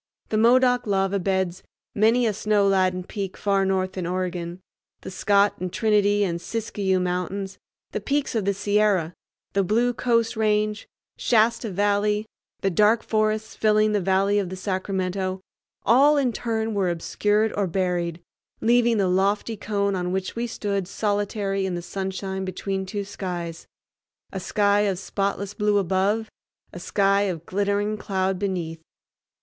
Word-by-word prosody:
The 215 Hz, -, 0 dB
Modoc 245 Hz, +1 st, +4 dB
Lava 195 Hz, 0 st, +1 dB
Beds, 190 Hz, -1 st, -1 dB, 0.3 s
many 225 Hz, +4 st, +3 dB
a 220 Hz, -, +1 dB
snow 210 Hz, -1 st, +2 dB
laden 185 Hz, -2 st, +2 dB
peak 195 Hz, 0 st, -5 dB
far 195 Hz, -1 st, +1 dB
north 185 Hz, -1 st, 0 dB
in 175 Hz, -, -3 dB
Oregon, 180 Hz, -1 st, -3 dB, 0.4 s
the -, -, -7 dB
Scott 200 Hz, +2 st, +3 dB
and 180 Hz, 0 st, -3 dB
Trinity 205 Hz, 0 st, +2 dB
and 170 Hz, -3 st, -2 dB
Siskiyou 200 Hz, -3 st, -1 dB
Mountains, 185 Hz, +2 st, -3 dB, 0.3 s
the 210 Hz, -, -3 dB
peaks 280 Hz, +5 st, -1 dB
of 220 Hz, -4 st, -1 dB
the 200 Hz, -, +2 dB
Sierra, 200 Hz, -4 st, +1 dB, 0.4 s
the 195 Hz, +1 st, +2 dB
blue 235 Hz, +6 st, +2 dB
Coast 230 Hz, -1 st, +1 dB
Range, 210 Hz, -1 st, 0 dB, 0.3 s
Shasta 225 Hz, 0 st, +2 dB
Valley, 205 Hz, +2 st, +1 dB, 0.4 s
the 195 Hz, -, +1 dB
dark 210 Hz, +5 st, +3 dB
forests 215 Hz, 0 st, 0 dB
filling 215 Hz, 0 st, +3 dB
the 205 Hz, -1 st, +1 dB
valley 195 Hz, +2 st, +2 dB
of 190 Hz, -3 st, -2 dB
the 185 Hz, -, -5 dB
Sacramento, 185 Hz, 0 st, -2 dB, 0.5 s
all 285 Hz, +5 st, +5 dB
in 260 Hz, -4 st, +1 dB
turn 225 Hz, -1 st, -2 dB
were 195 Hz, -3 st, +1 dB
obscured 210 Hz, +5 st, 0 dB
or 200 Hz, -2 st, 0 dB
buried, 175 Hz, -2 st, -1 dB, 0.4 s
leaving 235 Hz, 0 st, +3 dB
the 195 Hz, -2 st, +2 dB
lofty 200 Hz, +4 st, +1 dB
cone 200 Hz, -1 st, -1 dB
on 180 Hz, -1 st, -2 dB
which 190 Hz, 0 st, -3 dB
we 235 Hz, +1 st, -2 dB
stood 200 Hz, -4 st, -2 dB
solitary 205 Hz, -1 st, -1 dB
in 180 Hz, -, -2 dB
the 175 Hz, -, -4 dB
sunshine 190 Hz, +1 st, -4 dB
between 190 Hz, +1 st, -3 dB
two 205 Hz, +1 st, -3 dB
skies—a 175 Hz, -4 st, -8 dB
sky 205 Hz, -1 st, +2 dB
of 200 Hz, -3 st, +1 dB
spotless 200 Hz, +1 st, -2 dB
blue 210 Hz, -1 st, +1 dB
above, 200 Hz, +4 st, +1 dB, 0.5 s
a 175 Hz, -, -7 dB
sky 195 Hz, +2 st, +2 dB
of 170 Hz, -2 st, -5 dB
glittering 205 Hz, +2 st, 0 dB
cloud 190 Hz, -2 st, -1 dB
beneath. 175 Hz, -5 st, -3 dB
200 Hz, 150 wpm, -24 LUFS, 185-215 Hz, 0.5 s, all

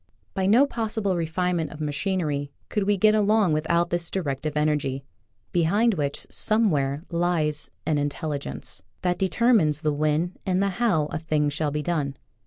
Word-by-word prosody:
By 190 Hz, -1 st, 0 dB
no 235 Hz, +8 st, +6 dB
possible 220 Hz, -6 st, -1 dB
refine 175 Hz, +2 st, 0 dB
ment 160 Hz, -2 st, -2 dB
of 150 Hz, -, -10 dB
machinery 150 Hz, -2 st, -1 dB, 0.2 s
could 205 Hz, -2 st, 0 dB
we 205 Hz, 0 st, +2 dB
get 215 Hz, +3 st, +5 dB
along 210 Hz, -4 st, +3 dB
with 155 Hz, +1 st, -1 dB
out 170 Hz, 0 st, +2 dB
this 175 Hz, -1 st, 0 dB
directive 150 Hz, -4 st, -2 dB
energy, 145 Hz, -3 st, 0 dB, 0.5 s
behind 200 Hz, +7 st, +3 dB
which, 145 Hz, -5 st, -2 dB
some 215 Hz, -1 st, +2 dB
where, 140 Hz, 0 st, -1 dB
lies 170 Hz, -3 st, 0 dB, 0.2 s
an 150 Hz, -2 st, +1 dB
Intelligence 145 Hz, 0 st, -4 dB, 0.2 s
that 180 Hz, -1 st, 0 dB
determines 190 Hz, -, +3 dB
the 155 Hz, -2 st, +1 dB
when 155 Hz, +4 st, 0 dB
and 185 Hz, -1 st, 0 dB
the 200 Hz, 0 st, +2 dB
how 190 Hz, -6 st, +1 dB
a 165 Hz, -, -2 dB
thing 155 Hz, -2 st, +1 dB
shall 150 Hz, +1 st, -1 dB
be 150 Hz, +1 st, -2 dB
done. 145 Hz, -5 st, -1 dB
165 Hz, 170 wpm, -25 LUFS, 150-195 Hz, 0.5 s, no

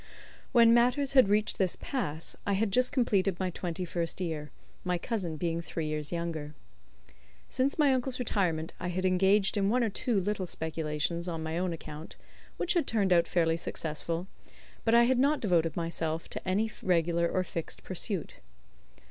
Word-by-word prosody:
When 230 Hz, -2 st, +6 dB
matters 250 Hz, +4 st, +3 dB
had 260 Hz, -7 st, +6 dB
reached 210 Hz, +1 st, +1 dB
this 185 Hz, -3 st, +2 dB
pass 160 Hz, -, -3 dB
I 200 Hz, -, 0 dB
had 200 Hz, +1 st, +1 dB
just 250 Hz, +4 st, +3 dB
completed 200 Hz, -8 st, +1 dB
my 185 Hz, -1 st, -1 dB
twenty 175 Hz, +1 st, -4 dB
first 170 Hz, 0 st, -2 dB
year, 160 Hz, -4 st, -3 dB, 0.3 s
my 180 Hz, -1 st, 0 dB
cousin 175 Hz, -5 st, -3 dB
being 170 Hz, +1 st, -1 dB
three 165 Hz, -1 st, -4 dB
years 150 Hz, -1 st, -3 dB
younger. 165 Hz, -3 st, -4 dB, 0.9 s
Since 265 Hz, +2 st, 0 dB
my 290 Hz, -4 st, +4 dB
uncle's 255 Hz, 0 st, -1 dB
retirement 180 Hz, -9 st, -1 dB
I 180 Hz, -, -3 dB
had 185 Hz, +1 st, -2 dB
engaged 195 Hz, +3 st, +3 dB
in 200 Hz, -1 st, +2 dB
one 245 Hz, +2 st, +2 dB
or 225 Hz, -, 0 dB
two 230 Hz, 0 st, 0 dB
little 195 Hz, -1 st, -2 dB
speculations 160 Hz, +1 st, -2 dB
on 165 Hz, -2 st, -3 dB
my 160 Hz, 0 st, -3 dB
own 180 Hz, -1 st, 0 dB
account, 155 Hz, -1 st, -8 dB, 0.4 s
which 360 Hz, -, 0 dB
had 345 Hz, -3 st, +1 dB
turned 200 Hz, -5 st, +2 dB
out 170 Hz, -1 st, +4 dB
fairly 165 Hz, -2 st, +2 dB
successful, 165 Hz, +1 st, -3 dB, 0.6 s
but 225 Hz, 0 st, +3 dB
I 235 Hz, -, +7 dB
had 250 Hz, +1 st, +3 dB
not 285 Hz, +3 st, +3 dB
devoted 165 Hz, -6 st, +1 dB
myself 165 Hz, -1 st, -2 dB
to -, -, -7 dB
any 210 Hz, +4 st, +1 dB
regular 170 Hz, -1 st, +2 dB
or 185 Hz, -, 0 dB
fixed 165 Hz, -2 st, -5 dB
pursuit. 185 Hz, -1 st, -3 dB
180 Hz, 175 wpm, -30 LUFS, 165-220 Hz, 0.9 s, I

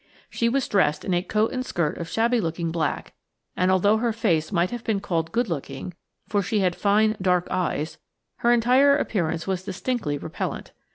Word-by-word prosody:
She 235 Hz, -, +1 dB
was 270 Hz, +2 st, 0 dB
dressed 155 Hz, -7 st, +1 dB
in 185 Hz, -, 0 dB
a 175 Hz, -, +2 dB
coat 215 Hz, +4 st, 0 dB
and 255 Hz, -1 st, -2 dB
skirt 170 Hz, -, -2 dB
of 170 Hz, -, -5 dB
shabby 235 Hz, +1 st, +2 dB
looking 165 Hz, -1 st, -2 dB
black, 160 Hz, -3 st, -2 dB, 0.4 s
and 185 Hz, 0 st, +2 dB
although 200 Hz, +3 st, +4 dB
her 235 Hz, +1 st, 0 dB
face 190 Hz, -8 st, 0 dB
might 175 Hz, -2 st, +1 dB
have 240 Hz, -1 st, -5 dB
been 215 Hz, -3 st, 0 dB
called 165 Hz, -4 st, -2 dB
good 235 Hz, +1 st, +1 dB
looking–for 170 Hz, +6 st, -5 dB
she 205 Hz, +2 st, 0 dB
had 180 Hz, -2 st, +1 dB
fine, 215 Hz, +2 st, +3 dB
dark 180 Hz, -1 st, +2 dB
eyes–her 170 Hz, +6 st, -2 dB
entire 255 Hz, +4 st, +5 dB
appearance 170 Hz, -, -1 dB
was 190 Hz, -2 st, -1 dB
distinctly 190 Hz, -, -2 dB
repellent. -, -, -5 dB
190 Hz, 175 wpm, -24 LUFS, 170-225 Hz, 0.4 s, entire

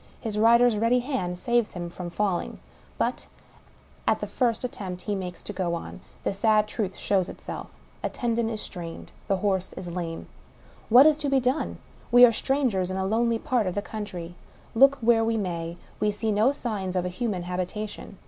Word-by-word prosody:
His 215 Hz, -3 st, -3 dB
rider's 235 Hz, 0 st, +5 dB
ready 235 Hz, +3 st, +3 dB
hand 240 Hz, -10 st, -2 dB
saves 240 Hz, +2 st, +1 dB
him 175 Hz, -1 st, -5 dB
from 175 Hz, 0 st, -6 dB
falling. 185 Hz, 0 st, -1 dB, 0.4 s
But, -, -, -1 dB, 0.8 s
at -, -, +3 dB
the -, -, -3 dB
first 240 Hz, -1 st, 0 dB
at 250 Hz, -, -3 dB
tempt 180 Hz, -3 st, -6 dB
he 210 Hz, -, -2 dB
makes 180 Hz, -3 st, -5 dB
to 205 Hz, -, -6 dB
go 180 Hz, -3 st, -1 dB
on, 170 Hz, -, -7 dB, 0.2 s
the -, -, 0 dB
sad 210 Hz, +1 st, +3 dB
truth 205 Hz, -3 st, -3 dB
shows 190 Hz, -3 st, +1 dB
itself -, -, -7 dB, 0.2 s
— -, -, -30 dB
a -, -, 0 dB
tendon 235 Hz, -2 st, -1 dB
is 220 Hz, -2 st, -4 dB
strained; 170 Hz, -2 st, -7 dB, 0.2 s
the 195 Hz, -, +2 dB
horse 190 Hz, -1 st, -1 dB
is 175 Hz, -2 st, -6 dB
lame. 170 Hz, -2 st, -4 dB, 0.2 s
* -, -, -27 dB
# -, -, -26 dB
What 250 Hz, +5 st, +9 dB
is 310 Hz, -1 st, +5 dB
to 290 Hz, -2 st, 0 dB
be 275 Hz, -1 st, +4 dB
done? 255 Hz, +4 st, -1 dB, 0.3 s
We 245 Hz, +1 st, +10 dB
are 240 Hz, -, +5 dB
strangers 230 Hz, -7 st, 0 dB
in 190 Hz, -, -3 dB
a 190 Hz, -, 0 dB
lonely 230 Hz, +3 st, +2 dB
part, 230 Hz, -2 st, 0 dB
of 180 Hz, -, -2 dB
the 205 Hz, -, -1 dB
country. 185 Hz, -6 st, -6 dB, 0.4 s
Look 275 Hz, +4 st, +6 dB
where 225 Hz, 0 st, +4 dB
we 225 Hz, 0 st, +1 dB
may, 170 Hz, -4 st, -3 dB, 0.2 s
we 210 Hz, -, +2 dB
see 215 Hz, +2 st, -1 dB
no 215 Hz, +6 st, +4 dB
signs 205 Hz, -9 st, -3 dB
of 180 Hz, -1 st, +1 dB
a -, -, 0 dB
human 185 Hz, -1 st, -2 dB
habitation. 185 Hz, +3 st, -5 dB
210 Hz, 205 wpm, -26 LUFS, 180-235 Hz, 0.8 s, We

